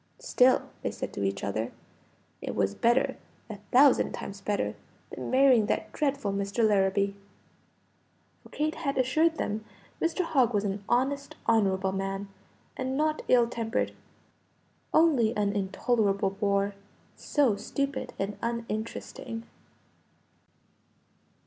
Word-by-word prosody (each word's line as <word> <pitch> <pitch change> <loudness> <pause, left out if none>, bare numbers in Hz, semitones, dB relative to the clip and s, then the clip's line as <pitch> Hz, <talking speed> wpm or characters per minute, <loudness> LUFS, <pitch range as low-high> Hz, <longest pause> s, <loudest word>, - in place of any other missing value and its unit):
"Still," 255 +1 +3 0.2
they - - -1
said - - -6
to - - -4
each 100 0 -1
other, 110 +3 -2 0.7
"it - - -4
was 95 - +1
better, 235 - +2 0.3
a 210 - -6
thousand 270 +2 +5
times 200 0 -7
better, 205 0 -1 0.4
than - - -6
marrying 255 -5 +5
that 215 0 -2
dreadful 275 -8 -1
Mr. 200 +3 +1
Larrabee." 200 -1 +2 1.3
For - - -17
Kate 310 +1 -1
had 285 -4 -3
assured 310 +6 +3
them 215 -5 -3 0.4
Mr. 335 +2 +1
Hogg 255 -8 +2
was 205 - +2
"an 200 0 -3
honest, 275 +3 0
honorable 195 -4 +2
man, 195 +1 -3 0.5
and 260 0 -2
not 310 +1 +1
ill 240 -2 +5
tempered; 230 -1 -2 1.0
only 260 -9 +3
an 205 -1 +1
intolerable 200 0 +1
bore 200 0 0 0.4
so 275 -8 +1
stupid 275 +6 -3
and 195 +1 -3
uninteresting." 230 0 -4
225 Hz, 120 wpm, -28 LUFS, 200-260 Hz, 1.3 s, thousand